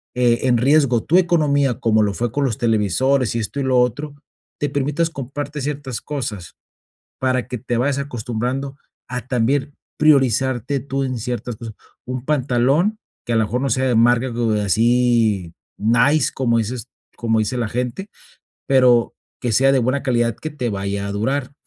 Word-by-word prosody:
eh, 120 -1 +2
en 125 -1 +4
riesgo 130 -2 +3
tu 170 - +3
economía, 145 -7 +2
como 110 -3 +2
lo 100 -1 0
fue 120 -1 -2
con 145 +4 -1
los 115 -5 -1
televisores 115 +4 +1
y - - 0
esto, 115 +6 -4
y - - 0
lo 130 -1 +2
otro, 140 +5 -1 0.4
te 145 - 0
permitas 145 +4 0
comprarte 145 +1 -5
ciertas 140 -3 -4
cosas, 110 - -5 0.7
para 130 -1 0
que 125 - -4
te 120 +1 -3
vayas 140 +3 +1
acostumbrando 130 +1 -3 0.3
a 125 0 -5
también 135 +3 0 0.2
priorizarte 135 -2 +2
tú 135 +1 -3
en 130 -2 -3
ciertas 120 0 -4
cosas. 110 -1 -8 0.3
Un 125 0 -5
pantalón 145 - +1 0.3
que 120 - -2
a - - +2
lo 110 - +3
mejor 120 +4 -2
no 140 - 0
sea 130 +3 +1
de 125 - +2
marca 120 +2 +3
como 115 -1 0
de 105 -1 +1
así 115 -3 +2 0.3
nice, 120 +7 +3
como 120 -3 +1
dices 115 +2 -3 0.3
como 115 -2 +1
dice 110 +4 -1
la 115 -2 -1
gente, 125 - -3 0.6
pero 125 -3 +4 0.3
que 120 - -1
sea 135 +5 +4
de 135 - +3
buena 130 +4 0
calidad 120 -4 +1
que 155 - -5
te 130 -5 -3
vaya 100 0 -3
a 100 - -4
durar. 130 +7 -2
125 Hz, 175 wpm, -20 LUFS, 115-140 Hz, 0.7 s, en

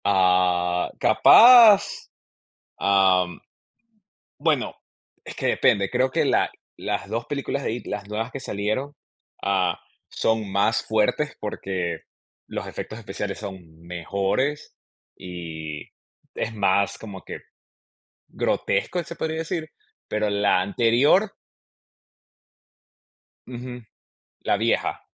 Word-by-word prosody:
Ah, 90 -2 +2
capaz. 230 -4 +7 0.7
Am. 95 -2 +2 1.0
Bueno, - - 0 0.5
es - - -8
que - - -2
depende. 100 -1 +2
Creo 130 +1 +1
que - - +1
la - - +2 0.3
las - - -3
2 115 +1 -3
películas 140 -1 -3
de - - -1
It, 120 - -6
las 100 -1 -5
nuevas 110 +3 -3
que 135 - -6
salieron, 110 +5 -3 0.5
ah, 95 -3 0 0.3
son 110 -3 -1
más 100 +3 +1
fuertes, 110 +7 0
porque 95 -5 -4 0.4
los - - -6
efectos 110 - -7
especiales 105 -2 -5
son 90 -6 -10
mejores 100 - -2 0.4
y 80 -4 -7 0.5
es 110 - -3
más 100 -1 +1
como 100 -3 -10
que - - -8 0.9
grotesco, 180 - -1
se 170 - -8
podría 160 -1 -3
decir, 160 0 -4 0.4
pero 105 0 0
la 100 -2 +2
anterior 120 - +3 2.1
Ujú. 125 0 -7 0.6
La - - +1
vieja. - - -1
105 Hz, 105 wpm, -24 LUFS, 95-125 Hz, 2.1 s, capaz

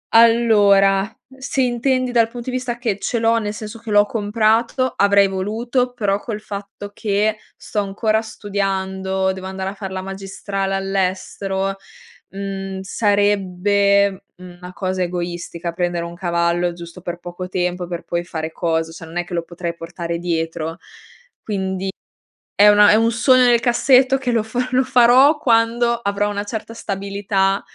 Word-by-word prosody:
Allora, 205 -3 +5 0.3
se 265 0 -1
intendi 255 +1 0
dal 230 -2 +3
punto 240 +2 -6
di - - -3
vista 245 -2 -4
che 225 -5 -2
ce 240 - -2
l'ho 230 0 +2
nel 210 -2 -3
senso 215 +1 -8
che 230 0 -10
l'ho 205 0 +5
comprato, 225 +4 +1
avrei 200 0 +4
voluto, 230 +6 -1
però 205 -4 0
col 215 -1 -5
fatto 205 -1 -8
che 215 0 0 0.2
sto 210 - -4
ancora 215 +2 0
studiando, 190 -3 -2
devo 190 0 -7
andare 190 0 -4
a - - -9
far 195 -2 -7
la 190 0 -4
magistrale 195 0 -4
all'estero, 195 0 -2 0.5
mhmm, 195 -1 -5
sarebbe 200 -1 +1
una 180 0 -11
cosa 185 -1 -2
egoistica 175 -1 -4
prendere 175 -1 -2
un 170 - -7
cavallo 170 0 0
giusto 170 +1 -11
per 175 0 -5
poco 175 +1 -7
tempo, 180 -1 -2
per 175 -1 -5
poi 170 0 -2
fare 160 -2 -5
cosa 165 -1 -1
cioè 165 0 -10
non 165 +2 -8
è 175 - 0
che 175 - -10
lo 170 - 0
potrei 170 0 -5
portare 170 0 -5
dietro, 165 -1 -3 0.6
quindi 190 -2 -3 0.7
è 205 +1 +8
una 205 0 +7
è - - +6
un 230 +1 +3
sogno 255 +2 +4
nel 240 -1 +5
cassetto 255 +2 +4
che 260 -2 -2
lo 230 - +2
fa 245 +3 -2
lo 260 +1 +3
farò 260 +4 +5
quando 235 -2 +2
avrò 205 -3 -1
una 205 0 -3
certa 220 +1 -6
stabilità 195 -1 -1
200 Hz, 160 wpm, -20 LUFS, 185-225 Hz, 0.7 s, è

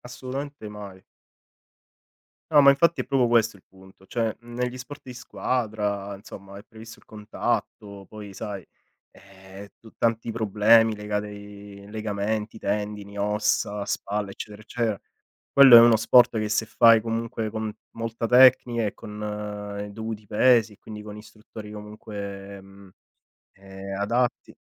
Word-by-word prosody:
assolutamente 130 0 -7
mai. 100 -3 -10 1.5
No, 150 - +7
ma 140 - +8
infatti 170 +5 +3
è - - -8
proprio 130 -3 +2
questo 115 -3 +2
il - - -24
punto, 95 0 -19
cioè 115 0 -2
negli 125 +1 -4
sport 130 +3 -10
di 125 -2 -10
squadra, 105 -5 -3
insomma, 100 0 -12
è - - -14
previsto 115 0 -13
il - - -25
contatto, 105 -1 -4
poi 105 -2 -10
sai, 100 -3 -6 0.5
ehm, 95 +1 -14
tu 115 - -15
tanti 115 0 0
problemi, 110 +1 +4
legati 105 0 -3
ai 100 -1 -11
legamenti, 105 0 -3
tendini, 105 0 -4
ossa, 105 0 0
spalla, 100 0 -3
eccetera, 105 +1 -9
eccetera; 110 -2 -3 0.5
quello 135 -3 +9
è 115 - +12
uno 115 -1 +7
sport 120 +1 +5
che 110 - -1
se 110 +1 0
fai 115 -1 +5
comunque 115 -1 -3
con 110 0 -4 0.2
molta 115 0 -3
tecnica 125 -2 +5
e 105 - -3
con 105 -1 -6
i - - -11
dovuti 110 0 -7
pesi, 115 0 +3
e - - -20
quindi 105 -1 -10
con 105 0 -9
istruttori 105 0 -12
comunque, 100 -2 -8
mhmm, 95 0 -16 0.7
ehm, 95 0 -9
adatti 120 +4 -1
105 Hz, 140 wpm, -25 LUFS, 100-115 Hz, 1.5 s, è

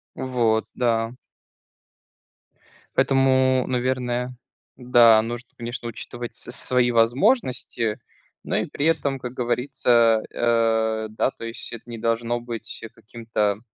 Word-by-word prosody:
Вот. 120 -4 0
Да. 115 -2 0 1.8
Поэтому, 130 -1 +3
наверное, 125 -1 -1 0.4
да, 120 -3 +6
нужно, 120 +1 -6
конечно, 120 0 -5
учитывать 120 +1 -7
с - - -10
свои 125 -1 +1
возможности, 120 - +1 0.4
но - - -2
и - - 0
при 145 - -3
этом, 140 -4 +1
как 125 -1 -6
говорится, 120 -2 +2
э, 110 -2 +1
да, 110 +4 0
то - - -12
есть 115 0 -7
это 115 +1 -10
не 115 - -6
должно 115 +1 -1
быть 120 -2 -7
каким-то, 110 -2 -2
120 Hz, 115 wpm, -23 LUFS, 115-125 Hz, 1.8 s, да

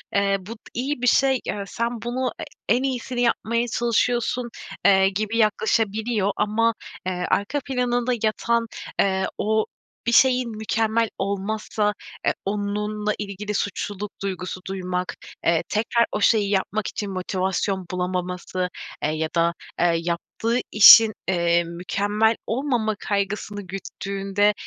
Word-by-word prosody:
eee, 200 0 +3
bu 190 +4 -10
t - - -24
iyi 260 +2 -2
bir 250 - +1
şey, 265 +1 +4
eee, 205 - -3
sen 235 +1 -3
bunu 245 +2 -1
e - - -4 0.3
en 255 - 0
iyisini 250 -2 -2
yapmaya 235 0 +1
çalışıyorsun." 240 +1 0 0.4
eee, 190 -1 +6
gibi 215 +3 -2
yaklaşabiliyor. 215 -1 +1
Ama, 225 +2 +2 0.3
eee, 180 -1 -2
arka 215 +9 +1
planında 250 -2 0
yatan, 230 +1 +1 0.3
eee, 190 -1 +2
o 220 +1 +1 0.4
bir 235 - +3
şeyin 250 -1 +4
mükemmel 220 +1 +1
olmazsa, 210 +2 -1 0.3
eee, - - +3
onunla 210 +1 -1
ilgili 205 0 -4
suçluluk 205 0 -3
duygusu 185 -1 -4
duymak. 185 -1 -3 0.3
Eee, 165 -1 +3
tekrar 230 +2 +2
o 210 - -2
şeyi 210 -3 +4
yapmak 205 +1 0
için 205 -2 -4
motivasyon 190 +1 -1
bulamaması, 180 0 -2 0.3
eee, 150 - +2
ya 155 0 -2
da, 170 0 +3 0.3
eee, 170 0 +4
yaptığı 180 +8 -1
işin, 215 +1 +10
eee, 170 -2 +2
mükemmel 205 +6 0
olmama 235 -3 0
kaygısını 205 0 -2
güttüğünde, 195 +2 -1
210 Hz, 130 wpm, -23 LUFS, 190-230 Hz, 0.4 s, işin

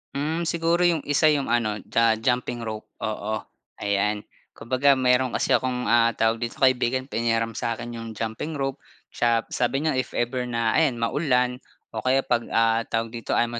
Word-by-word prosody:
Hmm, 160 +4 -1
siguro 170 0 +1
yung 165 -4 +1
isa 145 +2 +3
yung 145 -4 +1
ano, 110 -3 +1
ju - - -1 0.2
jumping 125 -1 0
rope 110 -1 -6 0.2
oo, 110 0 -2 0.5
ayan. 105 +1 0 0.3
Kumbaga 130 +4 +2
mayro'n 125 0 +2
kasi - - 0
akong, 125 -1 +1
ah 115 -1 +4
tawag 115 0 +1
dito, 120 -1 -4
kaibigan 130 0 +2
pinahiram 115 0 0
sa'kin 115 +2 -4
yung 115 -1 -7
jumping 115 +9 -4
rope. 135 0 -2 0.3
Tsa 115 -1 +1
p - - -31
sabi 130 +4 0
niya 150 -5 +1
if - - -4
ever 125 +1 -1
na 115 -2 0
ayan 155 -6 +2
maulan 125 0 0 0.3
o 110 - -4
kaya 130 +3 +2
'pag, 120 -1 0
ah, 115 0 +2
tawag 115 0 -2
dito 115 -1 -3
ayaw 120 0 0
120 Hz, 175 wpm, -24 LUFS, 115-130 Hz, 0.5 s, ah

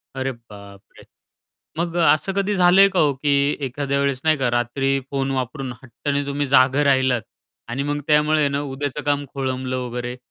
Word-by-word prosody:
अरे 135 0 -2
बापरे! 100 -4 -15 0.8
मग 170 0 -2
असं 170 +2 +3
कधी 200 +1 0
झालंय 185 +2 +6
का 185 - +2
हो, 145 -2 +3
की 140 +1 +1
एखाद्या 140 +1 -2
वेळेस 140 -2 0
नाही 155 -1 +3
का 125 -2 0
रात्री 135 +3 0
फोन 135 -1 -1
वापरून 130 0 -3
हट्टाने 140 +3 -3
तुम्ही 140 0 -2
जागं 135 +2 +4
राहिलात 130 -4 +2 0.5
आणि 130 +4 -3
मग 145 +1 -2
त्यामुळे 150 +1 +3
आहे 145 - +3
ना 140 +1 -2
उद्याचं 145 +1 -4
काम 145 0 0
खोळंबल 130 -1 -3
वगैरे? 125 0 -4
140 Hz, 170 wpm, -21 LUFS, 130-145 Hz, 0.8 s, झालंय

